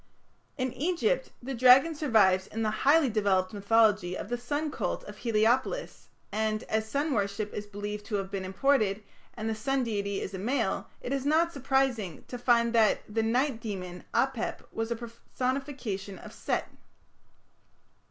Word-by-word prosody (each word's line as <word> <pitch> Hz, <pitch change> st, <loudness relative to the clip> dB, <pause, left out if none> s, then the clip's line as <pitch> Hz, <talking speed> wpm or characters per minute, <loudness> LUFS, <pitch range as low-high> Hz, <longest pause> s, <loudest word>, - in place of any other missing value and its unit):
In 255 Hz, -2 st, -1 dB
Egypt 365 Hz, -, 0 dB
the 270 Hz, +2 st, -4 dB
dragon 255 Hz, +6 st, +6 dB
survives 215 Hz, -11 st, +3 dB
in 225 Hz, +1 st, -3 dB
the 215 Hz, -, +1 dB
highly 285 Hz, +7 st, +4 dB
developed 200 Hz, -3 st, +1 dB
mythology 205 Hz, -3 st, +3 dB
of -, -, -6 dB
the 245 Hz, -, 0 dB
sun 290 Hz, +5 st, -2 dB
cult -, -, -3 dB
of 205 Hz, 0 st, -10 dB
Heliopolis, 240 Hz, -, 0 dB, 0.2 s
and, 215 Hz, 0 st, -1 dB
as 220 Hz, 0 st, -1 dB
sun 285 Hz, +4 st, 0 dB
worship 205 Hz, -1 st, -1 dB
is 205 Hz, 0 st, -5 dB
believed 205 Hz, 0 st, -5 dB
to 215 Hz, -, -2 dB
have 195 Hz, -1 st, -3 dB
been 195 Hz, -2 st, -3 dB
imported, 210 Hz, 0 st, +1 dB, 0.3 s
and 220 Hz, -1 st, -4 dB
the 225 Hz, -, 0 dB
sun 265 Hz, +5 st, 0 dB
deity 200 Hz, -3 st, -2 dB
is 195 Hz, -, -5 dB
a 190 Hz, -, -4 dB
male, 225 Hz, -1 st, -1 dB
it 255 Hz, -, -3 dB
is 275 Hz, -1 st, -1 dB
not 325 Hz, +4 st, +2 dB
surprising 265 Hz, -, 0 dB
to 245 Hz, -, -5 dB
find 235 Hz, -1 st, +3 dB
that 225 Hz, -2 st, +4 dB
the 225 Hz, +2 st, -1 dB
night 240 Hz, +2 st, +1 dB
demon, 180 Hz, -5 st, -6 dB
Apep, 265 Hz, -4 st, 0 dB
was 225 Hz, 0 st, -3 dB
a 235 Hz, -, 0 dB
personification 235 Hz, -3 st, -4 dB
of -, -, -11 dB
Set. -, -, -2 dB
225 Hz, 160 wpm, -29 LUFS, 205-265 Hz, 0.3 s, dragon